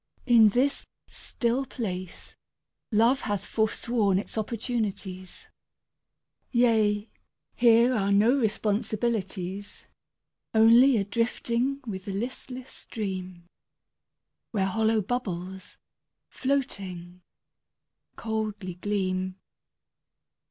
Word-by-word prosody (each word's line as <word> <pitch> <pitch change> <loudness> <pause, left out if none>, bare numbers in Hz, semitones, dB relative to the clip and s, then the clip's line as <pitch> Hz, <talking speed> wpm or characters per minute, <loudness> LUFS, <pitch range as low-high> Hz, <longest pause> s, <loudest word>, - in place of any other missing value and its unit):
In 230 -4 +7
this 260 +6 0 0.2
still 240 +3 -2
place 185 -8 -6 0.6
Love 230 +5 +4
hath 205 -2 -2
forsworn 220 -2 +1
its 200 - -4
opportunities. 210 -5 -3 1.0
Yea, 220 -4 +3 0.5
here 235 +1 +5
are 200 -4 +1
no 210 +5 +5
responsibilities. 210 -3 -2 0.7
Only 230 +4 +7
a 200 - +1
drifting 235 +5 -1
with 190 -5 -6
the 200 - -4
listless 255 +4 -5
stream 185 -5 -6 1.0
Where 200 -4 0
hollow 220 +2 +2
bubbles, 190 -5 -4 0.5
floating, 185 -10 -3 0.9
coldly 215 -4 -3
gleam. 185 -2 -1
215 Hz, 80 wpm, -27 LUFS, 190-235 Hz, 1.0 s, In